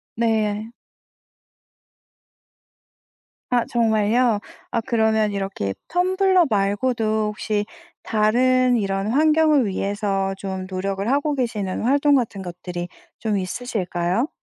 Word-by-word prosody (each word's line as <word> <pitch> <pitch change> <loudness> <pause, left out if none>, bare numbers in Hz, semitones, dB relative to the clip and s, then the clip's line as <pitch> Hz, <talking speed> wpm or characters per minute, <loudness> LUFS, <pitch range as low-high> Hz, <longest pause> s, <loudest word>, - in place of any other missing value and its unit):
네. 220 -1 0 2.8
아 245 -2 +2
정말요? 225 0 +2 0.3
아 230 - 0
그러면 220 -3 +2
이렇게 195 - -3
텀블러 370 0 +3
말고도 215 +1 0
혹시 210 0 -2 0.4
다른 250 +4 +3
이런 195 0 -1
환경을 305 0 +4
위해서 195 0 -1
좀 190 -1 -5
노력을 195 +2 -3
하고 290 +2 +1
계시는 215 -7 -2
활동 285 +4 +3
같은 225 -6 0
것들이 175 0 -6 0.3
좀 215 -2 -1
있으실까요? 185 - -2
215 Hz, 215 characters per minute, -22 LUFS, 195-250 Hz, 2.8 s, 환경을